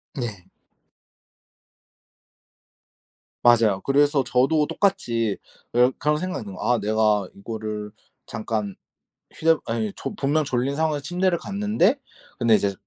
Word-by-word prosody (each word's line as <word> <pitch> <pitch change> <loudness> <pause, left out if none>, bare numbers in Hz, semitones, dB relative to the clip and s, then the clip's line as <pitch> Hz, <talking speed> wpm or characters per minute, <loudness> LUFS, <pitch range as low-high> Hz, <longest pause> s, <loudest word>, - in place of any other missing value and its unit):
네. 105 -8 -5 3.0
맞아요. 115 -5 +4
그래서 145 0 +3
저도 135 +5 +2
똑같이 115 - 0 0.4
어 125 +2 +4
그런 150 +1 +1
생각이 185 -6 -4
있는 100 -2 -9
거야. 125 - +1
아 115 - -1
내가 105 -1 +1
이거를 105 0 -6 0.3
잠깐 105 -3 -3 0.6
휴대 165 0 +3
아니 110 -3 -2
조 - - -5
분명 150 +3 +1
졸린 130 +1 -1
상황에서 155 -1 0
침대를 180 +2 +1
갔는데 210 - +1 0.4
근데 115 -3 +5
이제 100 -1 +1
125 Hz, 245 characters per minute, -24 LUFS, 110-155 Hz, 3.0 s, 근데